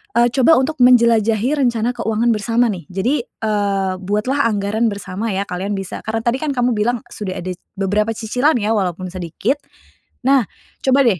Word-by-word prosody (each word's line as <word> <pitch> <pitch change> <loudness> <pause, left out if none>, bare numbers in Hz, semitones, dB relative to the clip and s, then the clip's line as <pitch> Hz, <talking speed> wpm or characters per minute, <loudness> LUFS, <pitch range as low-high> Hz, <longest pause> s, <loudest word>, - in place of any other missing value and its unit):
eee, 240 0 +5
coba 270 +6 +5
untuk 285 +3 -2
menjelajahi 235 0 +4
rencana 240 -3 +1
keuangan 230 0 0
bersama 230 +3 +1
nih. 180 -4 -6
Jadi, 235 +9 0
eee, 200 -5 -1
buatlah 210 +8 0
anggaran 210 +3 0
bersama 200 +2 -4
ya, 195 +1 -1
kalian 190 +3 -3
bisa 195 -2 -5
karena 225 +1 -1
tadi 235 +2 +1
kan 305 -2 -1
kamu 245 0 +2
bilang 235 +3 0
sudah 190 -3 -5
ada 185 +1 -4 0.3
beberapa 210 +3 +1
cicilan 250 +8 +1
ya 215 0 0
walaupun 185 -2 -2
sedikit, 185 - -2 0.6
nah 265 0 +4 0.4
coba 270 +1 +4
deh 195 -6 +2
220 Hz, 165 wpm, -19 LUFS, 200-245 Hz, 0.6 s, eee